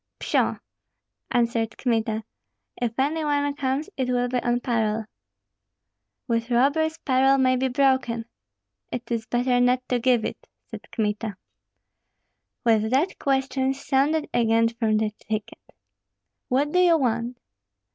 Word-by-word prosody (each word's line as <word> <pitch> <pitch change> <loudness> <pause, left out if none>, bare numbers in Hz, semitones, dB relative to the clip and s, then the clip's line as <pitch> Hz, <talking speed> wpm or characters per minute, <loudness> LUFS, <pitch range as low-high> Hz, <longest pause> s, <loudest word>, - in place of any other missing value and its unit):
"Pshaw!" - - +1 0.7
answered 230 -2 0
Kmita, 225 -3 0 0.5
"if 235 -2 -3
any 300 +4 0
one 285 -1 +1
comes 275 +2 -1
it 260 -2 -1
will 245 0 +1
be 245 0 -1
on 240 0 +1
parole." 225 -3 0 1.2
"With 230 -1 -1
robbers 290 +6 +2
parole 270 -1 +3
may 255 -1 +3
be 260 +1 +1
broken." 255 -3 +1 0.7
"It 245 -1 -6
is 225 -1 -2
better 245 0 +1
not 250 +1 +2
to 250 - +1
give 245 -2 +2
it!" - - -6 0.2
said - - -10
Kmita. 210 -2 -2 1.3
With 220 -2 +3
that 280 +10 +1
questions 270 0 0
sounded 295 +3 +2
again 230 -1 +3
from 225 -2 0
the 215 0 0 0.2
thicket. 215 -1 -4 0.9
"What 280 +3 +1
do 360 - +2
you 350 -2 +5
want?" 240 -2 -1
245 Hz, 130 wpm, -24 LUFS, 230-270 Hz, 1.3 s, you